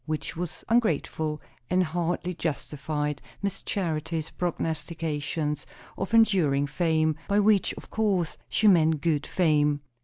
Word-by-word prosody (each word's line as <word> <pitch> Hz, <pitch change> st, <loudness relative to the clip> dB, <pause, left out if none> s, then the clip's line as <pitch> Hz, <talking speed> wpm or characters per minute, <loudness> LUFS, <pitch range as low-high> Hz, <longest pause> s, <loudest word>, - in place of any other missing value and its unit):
Which 155 Hz, -1 st, -3 dB
was 170 Hz, -1 st, -5 dB
ungrateful, 160 Hz, -8 st, +1 dB, 0.3 s
and 185 Hz, +1 st, +3 dB
hardly 175 Hz, +2 st, -1 dB
justified 150 Hz, -2 st, -3 dB, 0.2 s
Miss 200 Hz, -1 st, -2 dB
Charity's 165 Hz, -4 st, -2 dB
prognostications 155 Hz, -3 st, -2 dB, 0.3 s
of 195 Hz, +4 st, -1 dB
enduring 175 Hz, -11 st, +4 dB
fame; 160 Hz, +1 st, +1 dB
by 205 Hz, 0 st, +3 dB
which, 205 Hz, -1 st, +4 dB
of -, -, -12 dB
course, 195 Hz, -7 st, +1 dB
she 220 Hz, -, +3 dB
meant 160 Hz, -5 st, +5 dB
good 155 Hz, -4 st, 0 dB
fame. 150 Hz, -4 st, +2 dB
160 Hz, 120 wpm, -27 LUFS, 150-180 Hz, 0.3 s, meant